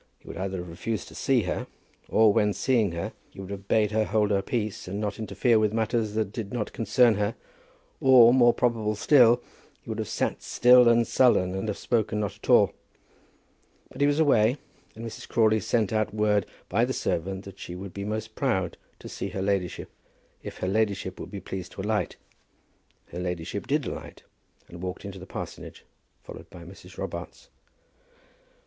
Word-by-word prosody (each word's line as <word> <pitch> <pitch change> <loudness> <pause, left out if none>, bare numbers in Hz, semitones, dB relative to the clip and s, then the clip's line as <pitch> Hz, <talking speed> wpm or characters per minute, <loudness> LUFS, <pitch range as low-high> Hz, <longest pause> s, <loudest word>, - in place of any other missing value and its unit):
He - - -24
would - - -7
either 95 +1 -3
have 90 0 -6
refused 95 +6 -4
to - - -14
see 130 -4 +1
her, 90 - -3 0.4
or 110 -2 +5
when 105 -2 +2
seeing 115 -7 +1
her 85 - -4 0.2
he - - -15
would 95 0 -7
have 100 0 -7
bade 105 -1 +2
her 110 0 +2
hold 105 -1 +1
her 100 -1 +2
peace 105 -2 -3
and 100 +3 -4
not 105 -1 -3
interfere 110 +1 +2
with 105 -1 +1
matters 110 -1 -1
which 110 -3 -1
did 110 -4 -6
not 115 -4 -3
concern 115 +2 +3
her, 105 +1 -1 0.6
or, 125 -3 +7
more 120 -2 +6
probable 115 -3 0
still, 120 -1 +5 0.4
he - - -28
would - - -4
have - - -2
sat - - -2
still 125 -1 +6
and 115 0 +4
sullen, 110 -8 +3
and 95 +3 -3
have 105 - -2
spoken 110 -3 0
not 105 -3 -2
at - - -13
all. - - +5 1.2
But - - -8
he 145 - +5
was 145 0 +2
away, 125 -5 +4 0.4
and 115 +1 -8
Mrs. 115 - -8
Crawley 110 -1 +3
sent 110 +1 0
out 110 -1 0
word 105 -1 +2 0.2
by - - +1
the - - 0
servant 95 +3 -2
that 100 -1 -11
she 90 - -7
would 95 0 -8
be 100 - -5
most 110 +1 -4
proud 95 - -1 0.2
to - - -11
see - - -5
her 95 - -4
ladyship, 95 -3 -2 0.5
if - - -8
her 90 - -3
ladyship 100 -2 -1
would - - -7
be 100 - -6
pleased 95 0 -7
to - - -6
alight. 105 +1 -1 0.9
Her 85 - -7
ladyship 90 +2 -4
did 145 0 0
alight, - - -7 0.4
and 85 0 -11
walked 90 +2 -5
into 100 -1 -7
the 95 - -11
parsonage, - - -8 0.4
followed - - -11
by 85 - -12
Mrs. 90 +2 -13
Robarts. - - -7
105 Hz, 190 wpm, -26 LUFS, 95-115 Hz, 1.2 s, or